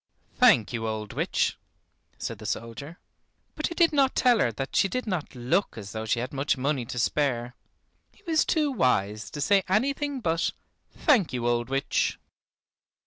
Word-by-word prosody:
"Thank 125 - +4
you, 115 -1 -2
old 110 -1 -4
witch," - - 0 0.6
said - - -5
the - - -7
soldier. 140 +8 -5 0.6
But 310 - -2
he 335 - -6
did 335 -2 +4
not 275 -2 +3
tell 245 -3 +4
her 120 - +2
that 135 +5 -5
she - - +4
did 255 +6 -3
not 185 - -3
look 130 +10 0
as 100 -2 -7
though 110 +1 -5
she 115 - +1
had 125 +4 -4
much 140 +1 0
money 135 -1 -1
to 125 - -6
spare. 125 -2 0 0.6
He - - -26
was 320 -2 +3
too 305 -3 +1
wise 110 - 0
to 150 - -7
say 195 +7 +4
anything 275 +7 0
but, 165 -6 0 0.4
"Thank 245 - +2
you, 120 -1 -1
old 120 0 0
witch." 135 +1 0
140 Hz, 175 wpm, -27 LUFS, -, 0.6 s, Thank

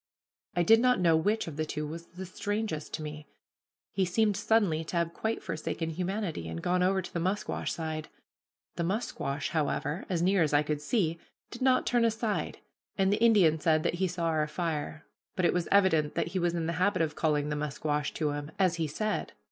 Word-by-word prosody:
I 175 - +3
did 225 +6 +6
not 250 -1 +3
know 170 -3 +4
which 205 +7 +1
of 150 -3 -7
the 155 - 0
two 150 0 -3
was 165 +3 -7
the 185 +2 -8
strangest 205 -4 -3
to 155 - -6
me. 150 0 -7 0.6
He 195 - +1
seemed 205 +3 +2
suddenly 195 -9 +2
to 170 - -3
have 170 0 0
quite 220 +5 -2
forsaken 165 +1 -3
humanity, 180 - -3
and 80 0 -4
gone 180 - +1
over 190 +1 +2
to - - -9
the 170 - -1
musquash 190 +5 -1
side. 155 -1 -4 0.7
The 170 - 0
musquash, 165 - -2
however, 155 +1 -1
as 175 -3 0
near 190 +1 +3
as 150 -2 +2
I 145 - +4
could 150 0 -2
see, 165 -2 0 0.3
did 240 - -9
not 255 -1 +3
turn 240 -1 +2
aside, 225 -1 -1 0.4
and 195 0 +3
the 210 - -1
Indian 195 -9 +5
said 155 0 +2
that - - +1
he 190 - +3
saw 175 -1 -3
our 155 -2 +1
fire; 155 -1 -3 0.3
but 185 - +1
it - - +3
was 180 -1 0
evident 185 -7 +3
that - - 0
he 185 +2 -2
was 175 -1 +1
in 165 -1 -1
the 165 - -1
habit 200 -3 +3
of 150 -2 -2
calling 150 -2 +1
the 150 - -1
musquash 150 0 -2
to 150 -2 0
him, 145 0 -4
as 185 -3 +2
he 160 -2 0
said. 215 +9 -2
170 Hz, 210 wpm, -30 LUFS, 155-195 Hz, 0.7 s, did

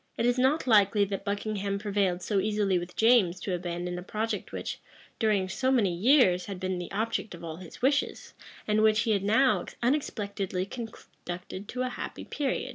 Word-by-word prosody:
It 230 - +1
is 245 +1 +2
not 265 +5 +2
likely 205 -3 +5
that 195 0 -4
Buckingham 200 -1 -2
prevailed 200 -3 0
so 205 -2 +1
easily 205 -2 +1
with 175 +1 -8
James 220 -6 +4
to 190 - -2
abandon 175 0 -3
a - - -6
project 215 +4 -3
which, - - -5 0.4
during 210 -4 +2
so 260 +7 -1
many 220 -9 +3
years, 185 - +4
had 195 -2 -6
been 185 -1 -2
the 175 - -6
object 220 -1 -2
of 170 - -12
all 160 -1 -6
his 180 +5 -12
wishes, 280 +2 0 0.3
and 210 0 +3
which 215 0 +4
he 230 - +1
had 200 -2 +2
now 240 +6 +3 0.2
unexpectedly 200 -8 -1
conducted 195 -4 -8
to 255 +2 -3
a 255 - -1
happy 245 - -6
period. 280 -3 -2
205 Hz, 185 wpm, -28 LUFS, 185-230 Hz, 0.4 s, likely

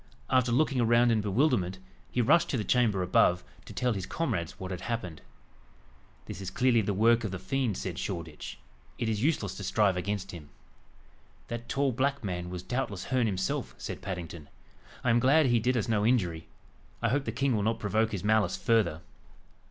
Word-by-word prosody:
After 130 -2 +3
looking 135 0 +2
around 120 +1 +4
in 110 -2 +2
bewilderment, 105 - +1 0.3
he 125 - +1
rushed 170 +8 +4
to 130 - 0
the 110 - -1
chamber 110 -6 +2
above, 90 0 +3 0.2
to - - -10
tell 125 -1 0
his 95 -3 -4
comrades 115 - -2
what 95 0 -5
had 90 -2 -5
happened. 90 -9 -4 1.0
"This 95 - -7
is 95 - -4
clearly 125 0 +3
the 105 - -1
work 115 +3 +4
of 105 - -2
the 95 - -4
fiend," 125 -1 -1
said 90 -3 -4
Shoreditch; 85 -5 -5 0.4
"it 120 - -2
is 110 -2 -1
useless 120 - 0
to 100 - -6
strive 100 -1 +2
against 100 +1 -3
him." 80 -4 -10 1.0
"That 120 0 -6
tall 140 -1 +1
black 135 +2 0
man 90 -3 -3
was 90 -1 -6
doubtless 125 -6 -3
Herne 125 -3 +1
himself." 95 -2 -2
said - - -6
Paddington. 85 -5 -6 0.5
"I 120 - +3
am 115 - +4
glad 145 +5 +4
he 120 -2 +3
did 125 +3 +1
us 110 - -1
no 110 -3 +1
injury. 90 -9 +1 0.5
I 115 - +1
hope 135 +3 0
the 115 - -2
king 130 +2 +1
will 105 - 0
not 110 +2 0
provoke 110 +2 +1
his 100 -3 -4
malice 110 0 +2
further." 110 -9 +1
110 Hz, 190 wpm, -29 LUFS, 95-125 Hz, 1.0 s, around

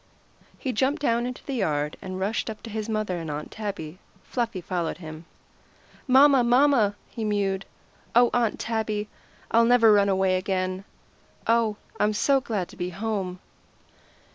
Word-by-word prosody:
He 260 - -3
jumped 270 +7 +1
down 240 -4 +1
into 250 - -7
the 275 - -4
yard, 150 - -1
and 185 0 -5
rushed 205 +4 -1
up 215 - -8
to 225 - -8
his 215 +1 -4
mother 215 -5 -1
and 165 -2 -6
Aunt 150 +1 -5
Tabby. 190 -6 -6 0.2
Fluffy 235 -6 -2
followed 175 -2 -3
him. 160 -1 -9 0.8
"Momma! 270 0 +6
momma!" 240 -4 +4 0.2
he 230 - -5
mewed. 200 -2 0 0.5
"Oh, 240 0 +6
Aunt 235 -3 +1
Tabby! 215 -2 -2 0.4
I'll 230 +1 +5
never 230 -2 +6
run 200 -1 +4
away 190 -1 +2
again. 185 0 -2 0.6
Oh, 230 -2 +2 0.2
I'm 210 0 +2
so 270 +5 +3
glad 205 -7 -2
to - - -13
be 180 0 -3
home!" 195 -1 -3
210 Hz, 155 wpm, -26 LUFS, 185-235 Hz, 0.8 s, Momma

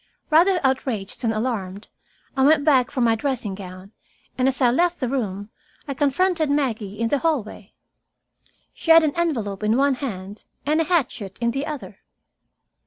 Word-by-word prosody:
Rather 355 +4 +5
outraged 255 -7 -1
than 230 -3 +1
alarmed, 215 -4 -3 0.5
I 265 - +2
went 290 0 +4
back 260 -5 +4
for 255 - -3
my 230 -1 +4
dressing 235 -3 -2
gown, 185 0 -10 0.4
and 255 0 +1
as 265 -1 0
I 245 -2 +4
left 345 +6 +1
the 255 - -1
room, 210 -5 -3 0.4
I 280 - -2
confronted 310 +4 +1
Maggie 225 -8 -1
in 230 0 0
the 285 - +1
hallway. 235 - -3 1.0
She - - -8
had 325 0 +8
an 300 -2 0
envelope 230 - -1
in 215 +2 +2
one 280 +1 +3
hand, 205 -6 -6 0.2
and 305 +3 +2
a - - 0
hatchet 255 - -1
in 235 0 +1
the 275 +4 -3
other. 215 -11 -7
255 Hz, 170 wpm, -23 LUFS, 210-290 Hz, 1.0 s, had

